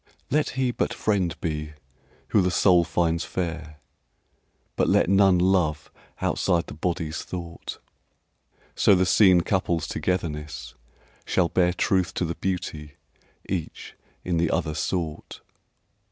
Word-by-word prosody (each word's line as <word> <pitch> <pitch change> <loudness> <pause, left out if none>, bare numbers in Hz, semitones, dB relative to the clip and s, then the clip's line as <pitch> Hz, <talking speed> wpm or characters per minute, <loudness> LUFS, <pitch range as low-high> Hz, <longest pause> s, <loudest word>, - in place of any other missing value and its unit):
Let 150 +2 +2
he 130 -2 +1
but - - -2
friend 95 -5 0
be 75 -2 -3 0.6
who 105 - +4
the 90 - +2
soul 90 -1 +4
finds 85 -1 0
fair, 80 -4 -4 1.0
But - - +1
let 90 - +3
none 95 -2 +5
love 85 -4 +1 0.3
outside 85 -1 +1
the - - -9
body's 80 0 -3
thought, 85 -2 -7 1.0
So 100 - +5
the 95 0 +2
seen 90 -1 +5
couple's 85 -3 0
togetherness 75 -8 -3 0.5
shall 90 -3 +1
bear 90 -1 +2
Truth 95 0 0
to 90 - 0
the 85 - -2
beauty 80 -6 -4 0.5
each 90 -5 -5 0.3
in 90 -2 0
the 80 -1 +1
other 75 - -1
sought. 80 -1 -4
85 Hz, 125 wpm, -25 LUFS, 80-95 Hz, 1.0 s, none